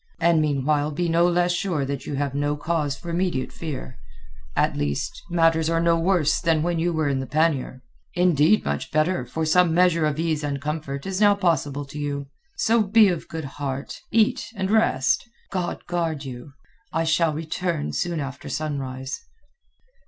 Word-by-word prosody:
And 170 -1 +4
meanwhile 145 0 +1
be 170 +4 -1
no 170 +1 +3
less 175 0 +2
sure 175 -5 -1
that 140 0 -4
you 145 - -3
have 140 -1 -1
no 145 +1 0
cause 150 -3 -1
for 170 - -7
immediate 170 -6 -1
fear. 140 - -6 0.6
At - - +2
least, 70 -1 -2
matters 165 -2 +3
are 165 0 +2
no 170 0 +3
worse 165 -3 +2
than 165 -3 +2
when 170 -1 0
you 175 +2 +1
were 160 -2 0
in 140 -2 0
the 130 - -4
pannier. 145 -3 0 0.3
Indeed, 175 +2 +4
much 70 0 -2
better, 155 -3 +1
for 160 +6 -2
some 165 +1 +4
measure 170 -3 +4
of 150 -1 -2
ease 160 -2 -1
and 140 -1 -2
comfort 145 -1 -4
is 195 +1 -2
now 205 -1 +6
possible 155 -7 0
to 140 +2 -8
you. 140 -1 -3 0.3
So 230 +1 +3
be 210 0 +5
of 175 -3 -3
good 160 -2 -5
heart; 135 0 -5
eat 230 +3 +2
and 190 0 -2
rest. 135 - +3 0.3
God 180 -2 -3
guard 165 -5 -2
you! 130 +1 -8 0.4
I 165 -2 0
shall 160 -1 +2
return 160 0 -2
soon 175 -2 -1
after 140 -2 -6
sunrise." 135 -3 -4
160 Hz, 175 wpm, -24 LUFS, 140-175 Hz, 0.6 s, now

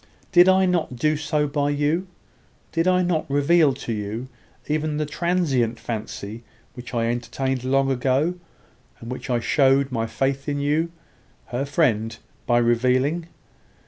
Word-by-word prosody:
Did 180 0 +7
I 190 0 +5
not 175 -8 0
do 150 +5 +1
so 150 0 0
by 145 0 0
you? 150 +6 0 0.6
Did 165 +1 0
I 185 0 +3
not 165 -3 -1
reveal 145 +2 +4
to 120 -3 -4
you 110 +4 -4 0.4
even 150 0 -1
the 155 - 0
transient 150 -7 0
fancy 110 -1 -6 0.3
which 125 0 -9
I 115 -1 +1
entertained 125 +2 -2
long 135 +1 +2
ago, 135 +6 +1 0.7
and 115 - -8
which 130 - -6
I 120 -1 +2
showed 135 +2 +3
my 115 -2 -1
faith 135 +4 -1
in 145 0 -1
you, 150 +4 0 0.6
her 125 +3 -2
friend, 115 -7 +1 0.3
by 120 - +3
revealing? 130 +7 +2
140 Hz, 145 wpm, -23 LUFS, 120-155 Hz, 0.7 s, Did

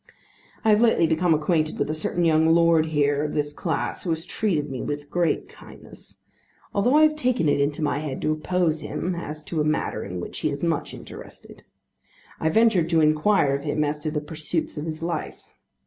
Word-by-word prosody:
I 220 - +5
have 210 +1 +4
lately 225 -7 +4
become 165 +2 +1
acquainted 155 0 0
with - - 0
a 155 - -2
certain 170 +2 -1
young 160 0 +4
lord 165 -1 +4
here 145 -1 +1
of 150 - -3
this 145 -1 -1
class 160 0 -3
who 180 - -4
has 165 +1 -2
treated 170 -10 -1
me 130 - -4
with 145 0 -5
great 175 -1 0
kindness, - - -14 0.6
although 240 +7 +2
I 310 - +6
have 305 0 +4
taken 250 - +1
it 145 - +2
into 145 +2 -1
my 145 -1 0
head 150 -3 -4
to 155 - +1
oppose 160 0 0
him 180 +4 -3
as 155 -3 -6
to 160 0 -2
a - - +2
matter 155 0 -1
in 90 -2 -6
which - - -6
he 155 - 0
is 140 +1 -5
much 165 -3 -1
interested. - - -12 0.8
I 160 - +1
ventured 200 -4 +3
to 165 -2 +3
inquire 155 0 +3
of 140 - -5
him 150 0 0
as 150 0 -2
to 155 +1 -3
the 150 -1 -2
pursuits 155 +2 -4
of 150 - -5
his 160 0 -5
life. 170 0 -4
155 Hz, 210 wpm, -24 LUFS, 150-170 Hz, 0.8 s, I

